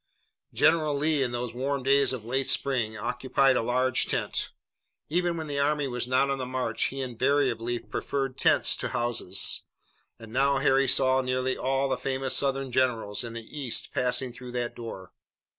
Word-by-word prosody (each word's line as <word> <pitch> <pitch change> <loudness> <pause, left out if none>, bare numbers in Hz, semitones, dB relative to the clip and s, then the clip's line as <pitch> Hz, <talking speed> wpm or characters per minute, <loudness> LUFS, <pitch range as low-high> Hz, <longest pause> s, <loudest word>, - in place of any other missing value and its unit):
General 155 -2 +3
Lee 150 0 +1
in 125 -2 0
these 120 -1 -4
warm 135 +2 -2
days 140 0 +4
of 125 -4 -5
late 130 +3 -1
spring 120 -6 +1
occupied 130 +4 +1
a - - +2
large 125 +2 +1
tent. - - -2 0.6
Even 175 +1 0
when 160 - -4
the 145 -2 -3
army 145 0 +1
was 125 -1 -3
not 130 +2 +2
on 135 - -2
the 130 - -3
march 125 -3 -1
he 135 0 -3
invariably 125 -2 0
preferred 135 +2 -3
tents - - +4
to - - -2
houses, 120 -6 0 0.6
and 115 -1 -12
now 140 +2 +2
Harry 135 0 +3
saw 130 0 +4
nearly 130 0 -1
all 135 +1 0
the 130 -1 -1
famous 130 0 -1
Southern 135 -1 0
generals 115 -5 0
in 120 -1 -7
the 115 -1 -7
east 135 -6 -1
passing 125 0 -1
through 125 0 -10
that 120 -1 -3
door. 95 -6 -9
130 Hz, 175 wpm, -27 LUFS, 120-135 Hz, 0.6 s, days